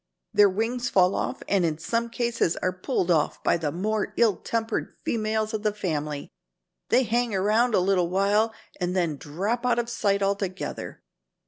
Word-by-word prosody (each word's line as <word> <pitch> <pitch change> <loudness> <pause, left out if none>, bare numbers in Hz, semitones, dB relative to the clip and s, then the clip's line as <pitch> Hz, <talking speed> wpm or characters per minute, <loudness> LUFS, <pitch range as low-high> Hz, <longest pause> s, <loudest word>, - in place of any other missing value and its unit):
Their 205 -1 +6
wings 235 +5 -1
fall 185 0 +4
off - - -3
and 195 -2 +2
in 160 -2 0
some 230 +8 -1
cases 235 -7 0
are 185 - -1
pulled 185 -1 -1
off 155 -3 +1
by - - +3
the 155 -3 -2
more 210 +5 -2
ill 225 -5 +4
tempered 225 -1 -2
females 220 -1 -1
of 215 - -2
the 210 -1 0
family. 150 -7 -3 0.6
They 260 - +4
hang 235 -1 0
around 215 +5 +2
a - - +4
little 180 -2 +2
while 200 +4 +2 0.3
and 180 0 -1
then 170 -5 +1
drop 195 - -2
out 245 -1 +2
of 240 0 -1
sight 200 -4 +1
altogether. 195 -2 -3
200 Hz, 175 wpm, -26 LUFS, 180-230 Hz, 0.6 s, Their